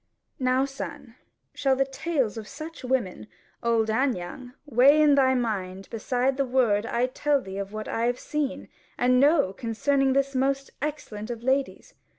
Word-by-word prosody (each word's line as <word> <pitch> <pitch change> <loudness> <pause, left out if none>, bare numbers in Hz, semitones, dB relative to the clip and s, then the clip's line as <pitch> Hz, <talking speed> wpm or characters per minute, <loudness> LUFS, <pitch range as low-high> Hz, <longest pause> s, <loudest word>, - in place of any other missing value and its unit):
Now, 255 +1 +2
son, 275 -2 -8 0.4
shall 270 -1 +1
the 270 +1 +2
tales 270 -4 -1
of 220 -2 -7
such 320 0 -9
women, 235 - -2 0.3
old 225 -2 +1
and 255 +1 +1
young, 245 +9 -8
weigh 280 +2 +5
in 300 -1 +6
thy 260 -2 +4
mind 195 -6 -3
beside 250 +4 0
the 275 - +2
word 235 -4 +2
I 240 +1 +1
tell 285 +3 +1
thee 195 -5 -7
of 200 0 -5
what 215 0 -6
I 230 +1 0
have 245 0 0
seen 300 -3 -3 0.3
and 250 +1 +3
know 285 - +4
concerning 265 +5 +1
this 275 0 +1
most 275 +1 0
excellent 245 -8 -5
of 235 -1 -6
ladies? 265 +2 -1
255 Hz, 165 wpm, -26 LUFS, 225-275 Hz, 0.4 s, in